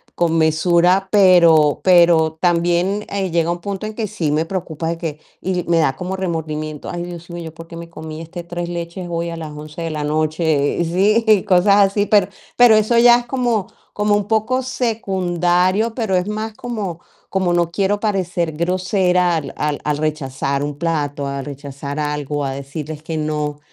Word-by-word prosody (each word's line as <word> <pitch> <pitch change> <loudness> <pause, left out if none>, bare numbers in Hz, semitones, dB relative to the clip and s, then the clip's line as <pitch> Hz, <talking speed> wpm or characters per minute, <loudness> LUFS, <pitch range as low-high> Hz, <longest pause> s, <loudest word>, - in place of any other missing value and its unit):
Con 165 -1 +1
mesura, 170 +4 +3
pero 170 -7 +5
pero 170 -3 +4
también, 175 +3 +1
eh, 195 -3 -2
llega 170 0 +1
un 175 - -3
punto 200 +2 -4
en 215 - -5
que 220 -2 -2
sí 170 -8 -2
me 155 +2 +1
preocupa 170 -3 -4
de 170 - -2
que 160 -3 -5 0.2
y 180 -1 -1
me 170 - +3
da 135 -4 +2
como 185 +1 -4
remordimiento: 155 -4 -4
"Ay, 175 0 -4
Dios 175 0 -9
mío, 170 0 -6
¿yo 160 - -8
por 165 0 -11
qué 170 - -10
me 170 0 -9
comí 160 -1 -8
este 170 +2 -8
3 175 0 -4
leches 170 +1 -5
hoy, 170 0 -2
a 165 - -6
las 155 -2 -6
11 150 +2 -9
de 165 - -2
la 150 -1 -3
noche?" 155 -1 0
Sí, 210 +4 +3
cosas 195 +1 +4 0.2
así. 205 0 +1
Pero 205 -3 +4 0.3
pero 245 -2 +7
eso 215 +2 +3
ya 240 0 +7
es 240 - -9
como 240 -6 -1 0.3
como 210 0 +1
un 205 -1 -1
poco 220 +4 +1
secundario, 190 -4 0
pero 220 -6 0
es 180 +2 -1
más 215 +1 -4
como 210 -9 -5 0.3
como 190 -2 0
no 170 -1 +1
quiero 200 +3 0
parecer 180 -6 -1
grosera 180 +1 +1
al 150 -4 -4
al 150 -1 -2
al 150 -1 0
rechazar 140 -2 -2
un 145 -1 -4
plato, 145 -4 -2
al 140 0 -4
rechazar 140 0 -7
algo, 150 -1 -2
a 135 - -2
decirles 145 +3 -7
que 160 0 -4
no. 150 -1 -2
170 Hz, 185 wpm, -19 LUFS, 155-195 Hz, 0.3 s, pero